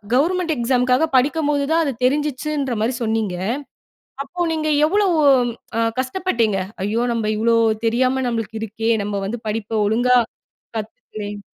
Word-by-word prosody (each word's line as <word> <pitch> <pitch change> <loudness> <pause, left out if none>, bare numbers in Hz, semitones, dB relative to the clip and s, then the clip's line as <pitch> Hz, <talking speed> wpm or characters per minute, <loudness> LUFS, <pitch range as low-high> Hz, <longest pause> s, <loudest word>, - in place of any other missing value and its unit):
Government 335 +3 +1
எக்ஸாம்க்காக 250 +3 +2
படிக்கும்போது 290 +1 +1
தான் 330 0 +3
அது 275 - -1
தெரிஞ்சிச்சுன்றமாரி 270 -4 0
சொன்னீங்க. 220 -4 -1 0.9
அப்போ 345 +4 -3
நீங்க 310 -1 -1 0.2
எவ்வளவு 385 -3 +2 0.6
அ - - +3 0.2
கஷ்டப்பட்டீங்க? 255 - 0 0.3
ஐயோ! 220 +3 0
நம்ப 230 -2 -1
இவ்வளோ 230 +1 +3 0.3
தெரியாம 255 +3 +1
நம்மளுக்கு 225 -1 -3
இருக்கே! 225 +1 -1
நம்ப 205 0 -3
வந்து 235 +4 -4
படிப்ப 220 0 -2
ஒழுங்கா 245 +4 +3 0.6
கத்துக்கல்லயே! 210 -1 -7
250 Hz, 120 wpm, -20 LUFS, 225-295 Hz, 0.9 s, தான்